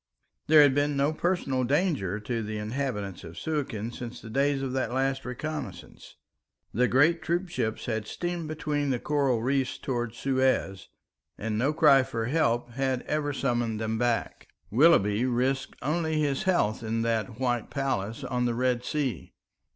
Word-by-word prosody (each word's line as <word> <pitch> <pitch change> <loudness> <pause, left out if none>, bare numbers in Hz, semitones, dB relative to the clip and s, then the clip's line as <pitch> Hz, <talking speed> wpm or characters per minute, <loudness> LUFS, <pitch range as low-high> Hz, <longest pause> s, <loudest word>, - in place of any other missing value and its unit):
There 150 -1 +8
had 140 -2 +5
been 145 +1 +1
no 140 +3 +2
personal 155 -7 0
danger 130 - 0
to 115 +2 -2
the 110 0 -4
inhabitants 105 -4 -3
of 85 0 -10
Suakin 130 -8 -3
since 120 0 -7
the 110 - -10
days 140 +2 +1
of 130 -1 -3
that 130 -3 -1
last 135 +1 0
reconnaissance. 145 +3 -6 0.6
The 125 +4 +3
great 160 +7 +4
troop 175 +3 -1
ships 115 -7 -2
had 110 -3 -2
steamed 175 +2 -3
between 150 -2 -2
the 130 - +1
coral 135 -4 0
reefs 135 0 0
towards 120 -3 -3
Suez, 130 -8 0 0.5
and 110 0 -3
no 130 +7 +2
cry 150 -3 +6
for 115 -4 -3
help 120 -4 +1
had 130 0 -1
ever 150 -1 -1
summoned 120 -5 -1
them 110 0 -2
back. 120 -1 -1 0.2
Willoughby 110 -5 +4
risked 130 +2 0
only 160 +2 0
his 145 -3 0
health 115 - +2
in 115 0 -1
that 115 0 -1
white 120 -3 0
palace 130 -3 -2
on 125 -1 -1
the 120 -1 0
Red 125 0 +1
Sea. 135 - -3
130 Hz, 160 wpm, -28 LUFS, 115-145 Hz, 0.6 s, There